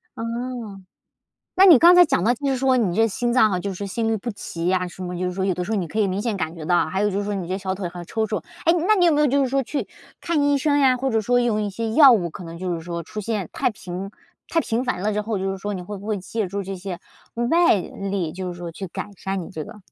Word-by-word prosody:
哦， 230 -3 -5 0.8
那 380 +2 +6
你 325 -9 +9
刚 345 +2 +8
才 355 - +9
讲 185 - +1
到， 240 - +4
就 280 +3 -4
是 265 - +1
说 260 0 +2
你 195 -5 0
这 225 0 +4
心 240 +3 -1
脏 235 -4 +4
哈， 180 -1 -1
就 200 0 -4
是 200 +2 -5
心 225 +3 -2
律 225 - +1
不 235 +4 -4
齐 170 -4 -6
呀 180 -1 +1
什 185 - -10
么， 180 0 -4
就 185 - -1
是 180 - -2
说 190 +1 -2
有 190 - +2
的 180 +1 -3
时 215 - -7
候 220 - +1
你 180 -4 -1
可 215 - -5
以 205 - +3
明 190 +2 -2
显 230 -3 -1
感 160 0 -3
觉 160 -2 -8
到。 175 0 +2
还 190 +5 -1
有 210 - +2
就 195 - -2
是 205 - -2
说 205 0 -2
你 185 -3 -4
这 190 +2 -2
小 190 -1 -3
腿 190 -2 -4
还 175 0 -8
抽 220 -1 -1
搐。 215 - -2 0.3
诶， 335 - +5 0.2
那 430 - +6
你 360 -3 +3
有 335 - +5
没 295 - +2
有 300 - +5
就 280 +1 +2
是 255 - -2
说 275 0 +1
去 285 +4 -3 0.3
看 335 -4 0
医 285 0 +3
生 285 +1 +2
呀， 260 -2 +4
或 265 +1 -1
者 225 -1 +2
说 245 +3 +2
用 220 -3 +1
一 205 - -1
些 220 +3 -3
药 280 -1 +8
物？ 175 -7 +1
可 180 - -9
能 165 0 -8
就 180 0 -3
是 165 - -5
说 170 0 -5
出 210 +6 -6
现 210 -4 -2
太 - - +1
频 190 -1 -7 0.4
太 330 - +2
频 230 +2 -1
繁 195 -8 -2
了 215 0 0
之 210 - 0
后， 215 -1 -2
就 195 +1 -1
是 195 - -6
说 205 +1 -4
你 180 - -5
会 205 +2 -7
不 200 - -11
会 215 -2 0
借 210 +2 -3
助 200 +1 -3
这 195 +1 -5
些 185 -1 -6 0.5
外 340 -5 +5
力？ 190 -3 -4
就 185 -1 -5
是 175 - -9
说 170 -1 -6
去 190 +3 -6
改 190 +4 -6
善 195 -1 -4
你 170 - -9
这 160 -4 -5
个。 210 +4 -11
205 Hz, 330 characters per minute, -23 LUFS, 185-245 Hz, 0.8 s, 你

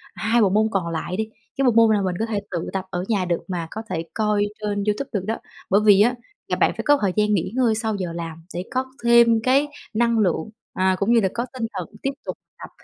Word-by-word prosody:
2 230 +2 +2
bộ 200 - +4
môn 215 +3 +3
còn 185 -4 -1
lại 170 +3 -3
đi, 220 0 -2 0.3
cái 275 - +2
bộ 245 - +5
môn 225 -1 +5
nào 200 - 0
mình 185 -2 -1
có 225 - +1
thể 220 -3 -2
tự 170 -2 -3
tập 190 -1 -2
ở 175 0 -3
nhà 205 -5 +1
được 175 -1 -1
mà 175 -3 -3
có 220 - -5
thể 165 - -2
coi 210 -2 +1 0.2
trên 205 -1 -1
YouTube 210 +6 -1
được 195 -3 -1
đó, 225 +2 -1 0.3
bởi 200 +2 +4
vì 205 -1 +7
á, 240 +4 +4 0.3
là - - 0
bạn - - +3
phải - - -3
có 290 0 +5
thời 195 -3 +2
gian 210 0 +2
nghỉ 185 -1 0
ngơi 245 -4 +3
sau 220 -1 -1
giờ 180 -4 -4
làm 165 -1 -6
để 175 - -3
có 260 0 0 0.2
thêm 235 -1 +6
cái 270 +4 +3 0.3
năng 235 +1 +2
lượng, 185 -1 +1 0.2
à, 185 0 +2
cũng 205 +4 +2
như 235 - +6
là 190 - +2
có 235 +1 -2
tinh 250 -3 -3
thần - - -4
tiếp 275 - 0
tục - - -5 0.2
tập - - -9
210 Hz, 260 wpm, -23 LUFS, 185-230 Hz, 0.3 s, vì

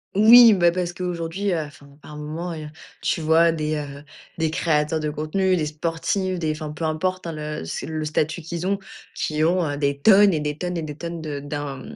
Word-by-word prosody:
Oui 230 +2 +9
bah, 175 -3 +4
parce 180 -1 -2
qu'aujourd'hui, 180 +2 -3
heu, 165 - 0
enfin 145 -1 -11
par 150 - -11
moments 155 +4 -5
et 155 - -7
heu, - - -8 0.3
tu 165 - -1
vois 165 +2 +4
des, 155 -1 -2
heu, 145 -1 -6 0.4
des 160 -1 +1
créateurs 155 -1 0
de 150 -1 -2
contenus, 185 +5 0
des 155 -3 -1
sportifs, 170 +4 -2
des 160 -2 0
enfin 155 -1 -6
peu 155 +2 -7
importe 180 +3 -2
hein, - - -3
le 150 - -5
c'est 80 - -5
le 155 0 -4
statut 155 +2 -1
qu'ils 170 +2 -5
ont, 200 +1 0 0.3
qui 155 0 -1
ont, 175 +2 +2
heu, 145 - -3
des 140 -1 -1
tonnes 200 +1 +6
et 155 - 0
des 150 0 -3
tonnes 180 +1 -3
et - - -2
des 150 -2 -7
tonnes 170 0 -6
de 150 -2 -5
d'un 145 -2 -6
160 Hz, 220 wpm, -23 LUFS, 150-175 Hz, 0.4 s, Oui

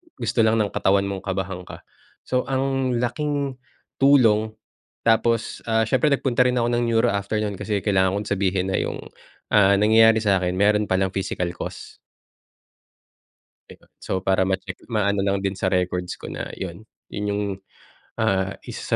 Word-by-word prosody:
gusto - - -2
lang 110 0 +4
ng 105 -3 0
katawan 100 +1 +2
mong 100 -1 -3
kabahan 95 -1 -3
ka. - - -10 0.4
So, 125 0 -1
ang 135 -1 0
laking, 140 +2 -2 0.4
tulong 115 -6 +4 0.5
tapos, 115 0 +1
ah, 110 0 +2
siyempre 130 +5 +1
nagpunta 125 -2 +1
rin 125 - 0
ako 120 -1 +1
ng 120 0 +1
neuro 115 -2 +2
after 100 +1 -2
no'n, 100 -3 -4
kasi 105 -3 -2
kailangan 95 -2 +2
kong - - -9
sabihin 95 -1 0
na - - +1
yung, - - -4 0.5
ah, 100 -1 +5
nangyayari 110 +2 +5
sa 100 -3 +3
akin 90 0 -1
meron 105 +2 +2
palang 95 0 +1
physical 95 -2 -2
cost. - - -8 1.7
'Di - - -12
ba, - - -26
so 95 0 -3
para 95 -1 +2
ma-check 95 0 -3
maano 100 -3 0
lang 100 0 0
din 95 -1 0
sa 95 - 0
records 90 -1 -1
ko - - -9
na - - -5
yun, 95 +3 -7 0.2
yun 105 - -4
yung, 100 0 -1 0.7
ah, 95 0 0
isa - - -3
105 Hz, 165 wpm, -23 LUFS, 95-115 Hz, 1.7 s, ah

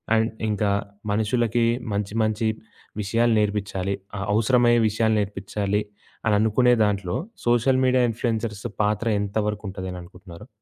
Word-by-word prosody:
And 110 0 +2 0.2
ఇంకా 105 0 0 0.4
మనుషులకి 115 +2 +1 0.3
మంచి 100 0 -2
మంచి 110 +1 0 0.5
విషయాలు 115 +3 +2
నేర్పిచ్చాలి. 100 -2 -1 0.2
ఆహ్, 100 - -3
అవసరమయ్యే 120 +1 +4
విషయాలు 110 +1 +1
నేర్పిచ్చాలి 100 0 -2 0.4
అని 110 -2 +3
అనుకునే 120 +3 +4
దాంట్లో 100 -4 -1 0.3
సోషల్ 120 +2 +3
మీడియా 130 -1 +3
ఇన్‌ఫ్లుయెన్సర్స్ 115 -2 -3 0.2
పాత్ర 105 +2 0
ఎంతవరకు 105 +1 -2
ఉంటది 95 0 -6
అననుకుంటున్నారు? 90 -1 -11
105 Hz, 120 wpm, -24 LUFS, 100-115 Hz, 0.5 s, అవసరమయ్యే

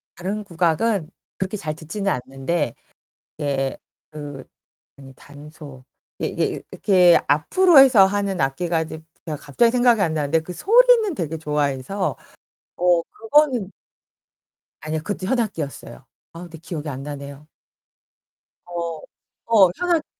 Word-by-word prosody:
다른 200 +4 -4
국악은 175 +1 0 0.3
그렇게 190 +2 -3
잘 155 -4 -4
듣지는 190 +5 -3
않는데. 135 +2 -2 0.7
예, 135 -2 -1 0.3
그 145 -3 -8 0.5
아니 135 -1 -13
단소. 145 -1 -13 0.3
이게 - - -3
이게 - - -2
이 - - -9
이렇게 180 -3 +4
앞으로 325 - +4
해서 250 -8 +7
하는 200 -1 -2
악기가 160 +5 0
이제 160 0 -8 0.2
제가 155 -2 -3
갑자기 190 - +1
생각이 245 -3 +3
안 160 -4 0
나는데 155 +1 +1
그 170 +3 -8
소리는 455 - +4
되게 165 - -4
좋아해서 150 +4 -2 0.6
어 175 -1 +3
그거는 245 - +1 1.1
아니요, 155 +1 -3
그것도 195 0 -4
현악기였어요. 185 - -3 0.3
아, 165 - -10
근데 170 -2 -10
기억이 155 -2 -6
안 135 -1 -6
나네요. 140 0 -9 1.2
어, 170 -2 -5 0.6
어. - - +1
현악기요. 345 -3 +1
170 Hz, 280 characters per minute, -22 LUFS, 145-205 Hz, 1.2 s, 해서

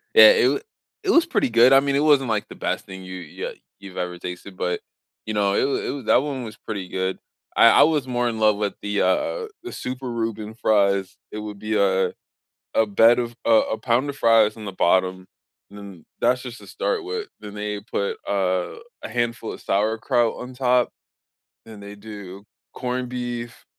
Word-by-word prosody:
Yeah, 460 - +11
it 450 -6 +4
wa - - 0 0.4
it 390 - +2
was 335 -3 +4
pretty 205 - +1
good, 120 +3 +6
I 135 - +8
mean, 140 0 0
it - - +3
wasn't, 140 -5 +4
like, 110 -2 -1
the - - -10
best - - -3
thing 95 0 -9
you 95 - -8
you 90 -5 -6
li - - -14 0.2
you've 100 -2 -11
ever 90 0 -3
tasted, 90 +2 -8
but, 90 -1 -1 0.5
you 110 - -2
know, 100 -1 +2
it - - +2
was 140 - 0
it - - -2
was 135 -4 -6
that - - +5
one 140 -3 -4
was 110 -2 -8
pretty 100 -4 -6
good. 95 0 -2 0.4
I - - +7
I - - +10
was 150 -4 +1
more 120 -1 0
in 115 -2 -3
love 110 -1 +4
with 105 -1 -1
the, 105 0 -1
uh - - +3
uh 455 - 0 0.2
the 365 - -7
super 125 0 -5
Reuben 110 -2 -3
fries, 100 -4 +2 0.2
it 105 - -5
would 105 -1 -7
be, 110 +1 -1
uh, 95 -2 +2 0.6
a 110 - +3
bed 115 +4 +5
of 120 -1 -2
a - - +1 0.3
a - - -16
pound 125 +3 +1
of 140 - -5
fries 115 -5 +4
on 110 -2 -8
the 100 - -5
bottom, 95 0 +1 0.4
and 100 - -12
then 100 -5 -11 0.2
that's 125 0 +2
just 125 -2 -8
to - - -14
start - - -1
with, 430 +2 -4
then 105 -1 -9
they 105 0 -4
put, 100 -2 -3
uh, 95 -2 0 0.3
a - - -5
handful 120 -2 -2
of - - -10
sauerkraut 110 +3 +1
on 125 +1 -8
top. 125 -1 +2 0.8
And 110 -2 -11
they 100 0 -9
do 100 -2 -10 0.3
corned 125 0 -3
beef 120 -1 -5
110 Hz, 210 wpm, -23 LUFS, 100-125 Hz, 0.8 s, Yeah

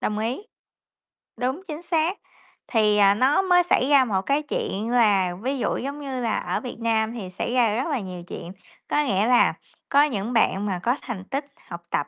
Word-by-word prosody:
Đồng 210 - -2
ý. 230 +4 -2 1.0
Đúng, 260 +7 -2
chính 310 -1 -6
xác. 340 +2 0 0.5
Thì, 215 -3 +2
à, 200 -1 +6
nó 260 - +3
mới 360 -2 +4
xảy 260 - +3
ra 280 -3 +6
một 195 -5 0
cái 280 +5 +1
chuyện 225 -6 -3
là, 200 -7 +3
ví 265 +4 -2
dụ, - - -1
giống 280 +3 -5
như 265 -3 -4
là, 230 -2 0
ở - - -2
Việt 250 -3 -7
Nam 225 -1 0
thì 205 -6 -6
xảy 185 +6 -4
ra 235 -4 +3
rất 255 +6 -1
là 290 -5 -1
nhiều 185 -4 -7
chuyện, 170 - -7 0.4
có 295 - +2
nghĩa 205 -5 +1
là, 245 0 +4 0.4
có 285 +1 +5
những 235 -5 -2
bạn 205 -3 +2
mà 190 -3 -2
có 245 +2 +2
thành 225 -7 -6
tích 275 +6 -3 0.2
học 170 0 -8
tập 145 - -1
240 Hz, 210 wpm, -24 LUFS, 205-275 Hz, 1.0 s, à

